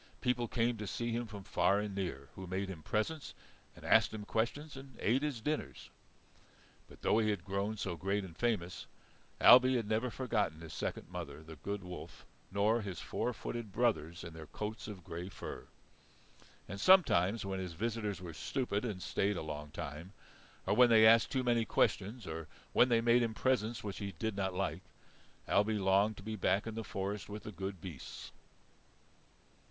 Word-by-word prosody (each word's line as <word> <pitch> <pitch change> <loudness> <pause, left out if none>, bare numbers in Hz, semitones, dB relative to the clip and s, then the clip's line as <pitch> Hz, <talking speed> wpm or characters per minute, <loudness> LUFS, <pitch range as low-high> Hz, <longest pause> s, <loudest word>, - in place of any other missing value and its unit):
People 125 -2 +1
came 115 +1 +1
to 105 -1 -5
see 120 +4 -2
him 120 +1 -2
from 100 -2 -8
far 90 +2 +2
and 105 -1 -3
near, 70 -9 -4
who 95 -1 -8
made 95 +2 -2
him 90 -5 -7
presents, 110 - -2 0.4
and - - -12
asked - - +5
him 105 -1 -6
questions, 140 +8 -1
and 135 -2 -11
ate 125 +5 +2
his 145 -6 -2
dinners. 150 +5 -3 1.0
But - - -16
though 110 - +4
he 110 -1 +2
had 100 -4 -2
grown 100 +2 -1
so 95 -4 -2
great 100 +3 -1
and 85 -4 -9
famous, 90 -5 -1 0.5
Ailbe 130 +1 +8
had 115 -4 0
never 110 +4 +1
forgotten 110 -9 -1
his 80 -2 -8
second - - -3
mother, 80 -4 -6
the 80 0 -10
good 100 +6 -4
wolf, 90 0 -9 0.3
nor 105 +4 +2
his 95 -4 -5
four 125 - -2
footed 120 -1 -5
brothers 90 -8 0
in 85 -2 -8
their 80 -1 -9
coats 105 +1 -5
of 100 -5 -8
grey 85 +3 -6
fur. - - -7 1.0
And 100 +2 -6
sometimes 115 - +5
when 95 -1 -2
his 90 -2 -4
visitors 105 +1 -2
were 90 -2 -7
stupid 115 - -2
and 105 -7 -3
stayed 100 0 0
a - - -3
long 75 -1 -5
time, 80 +3 -7 0.5
or - - +2
when 125 +1 +7
they 110 -1 +7
asked 115 0 +7
too 130 -2 +1
many 120 -2 +3
questions, 110 +2 0
or 80 0 -5 0.3
when 125 - +6
they 115 -1 +4
made 120 +1 +5
him 115 -2 0
presents 120 -2 +1
which 100 -2 -5
he 100 -2 -4
did 110 +3 -2
not 95 -2 -1
like, 95 -1 -1 0.7
Ailbe 105 +2 +3
longed 100 +2 +3
to - - -10
be 110 +1 -4
back 100 0 +1
in 115 - -4
the 115 0 -4
forest 100 0 -4
with 105 +1 -6
the 110 - -6
good 95 -1 -5
beasts. 85 -8 -8
105 Hz, 190 wpm, -34 LUFS, 95-115 Hz, 1.0 s, Ailbe